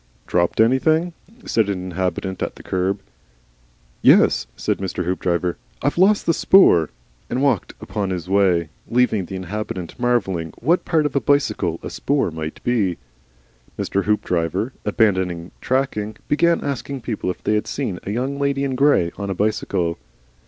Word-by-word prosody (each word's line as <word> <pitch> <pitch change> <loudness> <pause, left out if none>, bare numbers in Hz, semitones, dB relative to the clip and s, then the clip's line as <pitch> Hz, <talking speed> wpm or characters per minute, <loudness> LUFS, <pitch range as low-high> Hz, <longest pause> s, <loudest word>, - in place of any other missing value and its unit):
"Dropped 85 -1 0
anything?" 155 +9 +3 0.3
said 110 -3 +1
an 95 -2 -1
inhabitant 95 +1 -3
at - - -3
the - - -13
kerb. 95 +2 -1 1.0
"Yes," - - +5
said - - -1
Mr. 95 -2 -3
Hoopdriver, 90 -1 -1 0.3
"I've 145 +5 0
lost 200 +3 +4
the 165 - +3
spoor," 120 - +5 0.4
and 125 - -1
walked 140 - +1
upon 100 -3 -3
his 90 -2 -4
way, 95 -5 +2 0.2
leaving 115 -5 +2
the 95 - -7
inhabitant 95 0 -5
marvelling 95 -10 0
what 165 +8 +1
part 160 -3 +2
of 145 - -2
a 140 - +2
bicycle 105 - +1
a - - -5
spoor 140 -10 0
might 80 0 -6
be. 105 -8 +1 0.8
Mr. 100 - -1
Hoopdriver, 95 +1 0
abandoning 95 -5 +1
tracking, 110 -5 -1
began 170 +3 +2
asking 140 -1 -4
people 110 -5 -3
if 90 - -5
they - - +1
had 105 - 0
seen 115 -11 -3
a - - -7
Young 130 +6 -2
Lady 140 0 0
in 135 -1 -1
Grey 130 -11 +3
on 100 -1 -4
a 95 - -2
bicycle. 90 -4 -1
105 Hz, 155 wpm, -21 LUFS, 90-135 Hz, 1.0 s, Yes